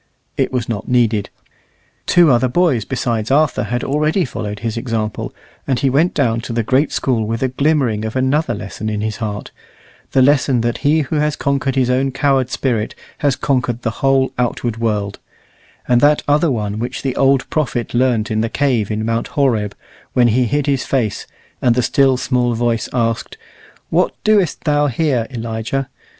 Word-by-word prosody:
It - - 0
was 125 -3 -2
not 110 -3 -4
needed: 115 -5 +1 0.8
two 170 -4 +5
other 125 +1 +3
boys 130 - +1
besides 115 -4 -2
Arthur 145 +2 +2
had 120 0 -2
already 155 +6 +1
followed 105 -5 -5
his 115 -2 -2
example, 115 -3 -3 0.4
and 135 -3 +1
he 135 +1 +1
went 160 +7 +2
down 115 -5 +1
to 120 - -6
the 115 0 0
great 135 +6 +2
School 115 -5 0
with 115 +3 -2
a 130 - +1
glimmering 130 -5 +1
of 110 +2 -4
another 130 0 +1
lesson 110 +1 -5
in 105 -1 -2
his 110 0 -3
heart 105 -3 -5 0.6
the 130 - +5
lesson 135 -3 +3
that 120 0 -1
he 155 +2 +3
who 150 +2 -2
has 150 0 +1
conquered 135 -1 -1
his 125 -2 +2
own 130 +2 +1
coward 135 -1 +1
spirit 120 -5 -1 0.2
has 145 -2 +2
conquered 125 -4 -1
the 115 - 0
whole 135 -1 +2
outward 120 -1 -1
world; 105 -3 -2 0.7
and 120 -1 +3
that 150 +1 +4
other 150 +3 +3
one 105 -4 -2
which 120 +2 -4
the 135 -2 -1
old 135 -1 +3
prophet 125 -6 -1
learnt 120 -2 +1
in 110 0 +1
the 115 - -1
cave 125 -7 0
in 110 0 -2
Mount 115 +1 -1
Horeb, 115 -8 0 0.4
when 120 -1 +4
he 125 +3 +2
hid 145 +4 0
his 140 -2 0
face, 115 -7 -1 0.3
and 120 -2 +3
the 125 - +1
still, 135 0 +3
small 125 -2 0
voice 115 -1 -1
asked, 115 -2 -1 0.5
"What - - +2
doest 205 -7 +2
thou 145 -2 +2
here, 130 -3 0
Elijah?" 115 +2 -3
125 Hz, 180 wpm, -18 LUFS, 115-140 Hz, 0.8 s, two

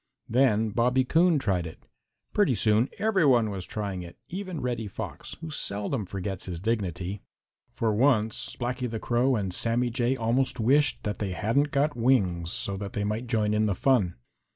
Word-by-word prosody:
Then 115 -3 +2
Bobby 125 +4 +2
Coon 165 +3 +4
tried 95 -10 0
it. 80 - -12 0.5
Pretty 200 - +3
soon 110 +4 +3
every 210 -4 +2
one 120 -7 +4
was 95 -2 -5
trying 100 -4 -4
it, 85 -1 -10
even 185 -3 -5
Reddy 120 -4 -2
Fox, 95 - -7
who 160 -1 -6
seldom 105 -3 -2
forgets 95 0 -4
his 85 -2 -4
dignity. 100 -2 -2 0.5
For 110 -2 0
once 110 -2 +1
Blacky 125 0 -2
the 110 -1 -4
Crow 125 +4 +2
and 95 -4 -2
Sammy 120 +4 0
Jay 120 +2 +1
almost 125 +3 0
wished 140 +6 +3
that 105 -1 -3
they 100 -3 -2
hadn't 115 - +1
got 145 +1 +1
wings, 95 -9 +2
so 100 0 -2
that 100 0 -6
they 105 - -1
might 105 +4 -2
join 110 -3 +1
in 110 0 +2
the 100 - 0
fun. 105 -8 +2
115 Hz, 175 wpm, -27 LUFS, 100-130 Hz, 0.5 s, Coon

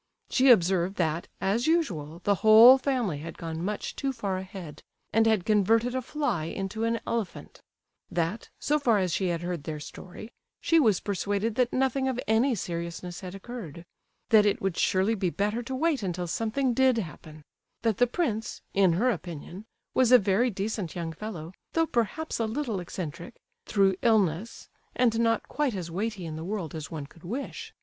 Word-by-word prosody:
She 265 +1 +4
observed 185 -3 +4
that, 165 -2 -1
as 220 +7 0
usual, 175 - 0
the 205 - +3
whole 230 +4 +9
family 245 - -1
had 165 +3 -8
gone 165 0 -5
much 210 +3 -3
too 275 - -1
far 205 -7 -3
ahead, 185 -5 -9 0.3
and 225 0 +4
had 220 -5 +2
converted 225 +3 +3
a 260 - -1
fly 245 - -2
into 195 +6 -3
an 230 0 0
elephant; 230 -5 -4 0.5
that, 170 +6 -2
so 300 +1 +1
far 235 -6 +3
as 185 -4 0
she 190 - 0
had 170 -1 -2
heard 175 -4 -3
their 155 0 -5
story, 185 +8 -10 0.3
she 330 - +3
was 215 - +3
persuaded 205 +3 -1
that 245 +1 +1
nothing 265 0 +1
of 255 -2 -1
any 230 +4 +3
seriousness 175 -1 -5
had 185 0 -7
occurred; 195 - -8 0.4
that 220 -3 +7
it 205 -1 +1
would 195 -3 -1
surely 190 +5 +2
be 190 -4 0
better 210 +6 -1
to 260 +2 -5
wait 305 -1 +1
until 180 -2 -2
something 230 +8 0
did 260 0 +3
happen; 155 -5 -7 0.4
that 225 -3 +1
the 245 - +4
prince, 235 -7 -2
in 190 -3 +4
her 240 +9 +2
opinion, 175 +1 -7 0.3
was 255 -2 +3
a 250 - +10
very 205 +3 +2
decent 200 -3 -3
young 165 -2 -4
fellow, 175 -3 -7 0.2
though 325 0 +3
perhaps 245 +4 -2
a 225 - +1
little 230 -3 -2
eccentric, 170 -1 -6 0.3
through 195 -2 +3
illness, 215 -3 +1 0.3
and 230 -3 +2
not 230 0 +1
quite 290 -7 -1
as 175 -3 -5
weighty 200 0 -3
in 155 -1 -5
the 160 - -6
world 185 -3 -4
as 155 -2 -6
one 155 -3 -5
could 160 +3 -19
wish. 240 +11 -5
205 Hz, 180 wpm, -27 LUFS, 175-235 Hz, 0.5 s, a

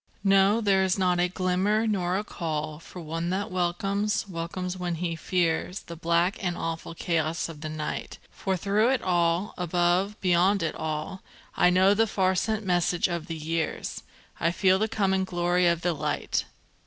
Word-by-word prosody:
No, 195 +2 +4
there 195 -3 +3
is 190 0 +1
not 180 -2 +2
a 175 - +3
glimmer, 185 +4 +1
nor 185 -4 0
a 205 - -2
call, 155 -5 -4
For 180 - -11
one 165 +1 -3
that 200 +4 -2
welcomes, 195 +4 0
welcomes 180 +1 -4
when 180 -2 -3
he 170 0 -2
fears, 175 +2 -1
The 170 - -9
black 170 +5 +1
and 175 -1 -1
awful 165 0 -4
chaos 160 -1 -1
of 160 -3 -10
the 155 - -4
night; 155 -1 -4
For 190 -2 -2
through 205 +6 +2
it 265 -1 +1
all, 175 +2 +1
above, 180 +4 +1
beyond 185 +1 +3
it 160 - -1
all, 160 +4 -4 0.3
I 180 - +5
know 185 +2 +5
the 225 +2 +2
far 190 -2 +1
sent 215 +3 -1
message 175 -1 +2
of 170 -3 -4
the 165 - -4
years, 160 +1 -3 0.4
I 165 - +2
feel 190 +2 +3
the 215 - +1
coming 195 -3 +1
glory 175 -1 +1
of 170 -1 +2
the 175 0 +1
Light! 150 -1 -1
180 Hz, 180 wpm, -27 LUFS, 170-195 Hz, 0.4 s, I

